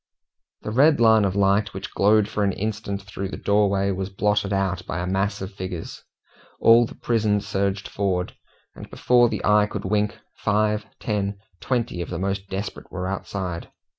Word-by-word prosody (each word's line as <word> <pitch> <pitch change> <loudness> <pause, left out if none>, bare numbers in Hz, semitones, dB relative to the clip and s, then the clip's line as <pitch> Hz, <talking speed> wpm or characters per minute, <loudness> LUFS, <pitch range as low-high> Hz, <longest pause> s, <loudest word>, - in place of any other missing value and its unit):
The 105 - -4
red 145 +5 +4
line 110 -2 +5
of 95 -1 -1
light 100 0 +2
which 95 - -6
glowed 105 +1 +4
for 105 - -1
an 100 -1 +1
instant 100 -1 -3
through 95 0 -5
the - - -6
doorway 100 -1 +2
was 95 0 -3
blotted 105 +1 0
out 95 -3 0
by - - -3
a 90 - -2
mass 95 +2 -1
of 95 - -7
figures. 95 -3 -6 0.6
All 115 +1 +6
the - - -12
prison 110 -3 +1
surged 100 -1 -2
forward, 95 -3 -2 0.4
and - - -11
before 120 -1 +3
the - - -3
eye 105 0 +4
could 105 -2 -5
wink, 105 +1 0 0.2
five, 105 +1 +1
ten, 100 -2 -2 0.2
twenty, 115 -8 -1
of 85 - -5
the 90 - -4
most 95 +2 -3
desperate 95 +2 -5
were 90 0 -4
outside. 95 -3 -4
100 Hz, 175 wpm, -24 LUFS, 95-105 Hz, 0.6 s, All